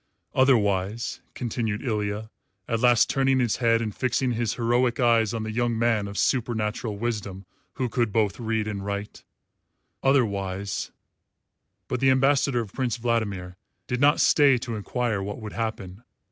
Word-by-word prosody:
"Otherwise," 110 -3 +2 0.2
continued 115 -3 -3
Ilya, 105 -2 -2 0.4
at 115 - 0
last 120 -1 +5
turning 135 -1 +2
his 120 -4 +1
head 115 -2 +2
and 110 -2 -4
fixing 130 0 0
his 115 -1 -1
heroic 120 0 +1
eyes 115 -3 +3
on 115 -2 -3
the 110 - -4
young 120 0 0
man 115 -3 +1
of 100 0 -7
supernatural 110 -3 -1
wisdom 100 -4 -4 0.3
who 130 - -2
could 120 -2 0
both 105 0 0
read 110 -2 -1
and 100 -2 -4
write, 100 +1 -5 0.8
"otherwise 100 -7 0 0.5
" - - -53
But 125 - -2
the 135 +1 +4
ambassador 135 -1 +3
of 105 -4 -8
Prince 125 -4 -1
Vladimir 100 -6 -2 0.3
did 125 +1 -2
not 145 +1 +5
stay 145 -5 +5
to 115 -1 -5
enquire 110 0 -2
what 100 +3 -5
would 110 -2 -7
happen. 110 -4 -4
115 Hz, 155 wpm, -25 LUFS, 105-125 Hz, 0.8 s, last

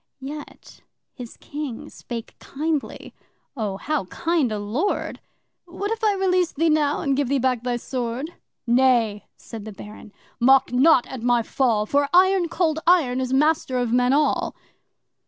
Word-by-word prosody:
Yet 290 +2 -10 0.3
his 245 -4 -10
King 290 -5 -7
spake 235 -2 -8
kindly 305 0 -4 0.4
(Oh, 210 -6 -3
how 300 -1 -2
kind 325 - -1
a 215 - -2
Lord!) 225 - -2 0.5
'What 385 +4 -5
if 450 0 -3
I 420 -2 +3
release 365 -2 +1
thee 325 +2 +1
now 300 -1 +1
and 275 -1 0
give 280 -1 0
thee 280 - +2
back 255 -2 0
thy 245 0 -2
sword?' 250 +5 -4 0.3
'Nay!' 235 -4 +2
said 225 -3 -9
the 215 - -8
Baron, 210 +1 -12 0.3
'mock 260 +1 +4
not 260 0 +5
at 260 -3 -8
my 240 -1 +2
fall, 225 -4 +1
For 280 +4 +1
Iron 370 -1 +4
Cold 320 -3 0
Iron 275 -8 +3
is 255 -1 -3
master 285 -1 +2
of 245 -2 -1
men 250 0 +3
all. 295 +2 +1
265 Hz, 155 wpm, -23 LUFS, 240-315 Hz, 0.5 s, not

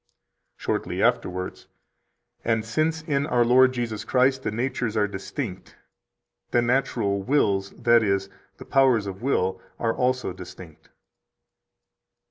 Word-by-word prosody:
142 - - -16 0.3
Shortly - - 0
afterwards: 90 0 -1 0.8
"And 115 -1 0
since 155 +7 0
in 145 -2 0
our 120 -4 +3
Lord 130 +2 +6
Jesus 115 -4 -3
Christ 130 +1 +2
the - - -2
natures 115 0 -2
are 105 -1 +3
distinct, 100 -1 -6 0.7
the 120 - +2
natural 120 -5 0
wills, 100 -5 +1
that 120 -1 +5
is, 100 -2 0 0.3
the - - -11
powers 130 -6 +3
of 95 -1 -6
will, 95 -8 0 0.2
are 115 -1 0
also 130 -5 0
distinct." 90 -3 -12
115 Hz, 125 wpm, -25 LUFS, 100-130 Hz, 0.8 s, Lord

